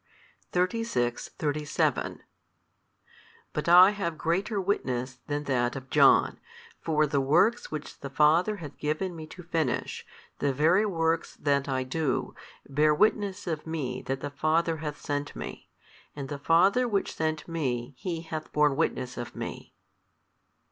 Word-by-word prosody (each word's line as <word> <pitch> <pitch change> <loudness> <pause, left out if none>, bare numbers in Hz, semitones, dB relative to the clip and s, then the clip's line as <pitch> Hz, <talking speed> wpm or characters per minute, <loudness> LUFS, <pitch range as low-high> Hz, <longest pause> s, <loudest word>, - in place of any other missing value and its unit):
|292 180 - 0
36,37 150 -1 -1 1.3
But - - -2
I 180 +3 +9
have 190 -6 -3
greater 195 +7 0
witness 130 -10 -2
than 145 0 -2
that 125 -3 0
of 130 -1 -8
John; - - +5 0.4
for 155 -1 +2
the 140 -1 +1
works 175 - +3
which 155 -1 -7
the 140 - -6
Father 160 +9 +3
hath 155 -8 -9
given 155 +5 -2
Me 160 -1 -8
to 180 +3 -11
finish, 165 -2 -2 0.4
the 140 - +1
very 170 +10 +3
works 165 -3 0
that 140 -1 0
I 130 -1 0
do, 140 +2 -1 0.3
bear 150 +2 +3
witness 205 +1 +1
of 160 -2 -4
Me 135 -6 -3
that 135 0 -2
the 145 - -4
Father 160 +3 +1
hath 150 -1 -5
sent 145 0 -3
Me: - - -8 0.5
and 140 -2 -6
the 145 - -5
Father 190 - +4
Which 200 -4 -1
sent 155 -1 -2
Me 135 -6 -2
HE 170 0 -3
hath 160 -1 -6
borne 150 -2 +3
witness 130 -5 -1
of 120 - -6
Me. - - -7
155 Hz, 145 wpm, -28 LUFS, 140-175 Hz, 1.3 s, I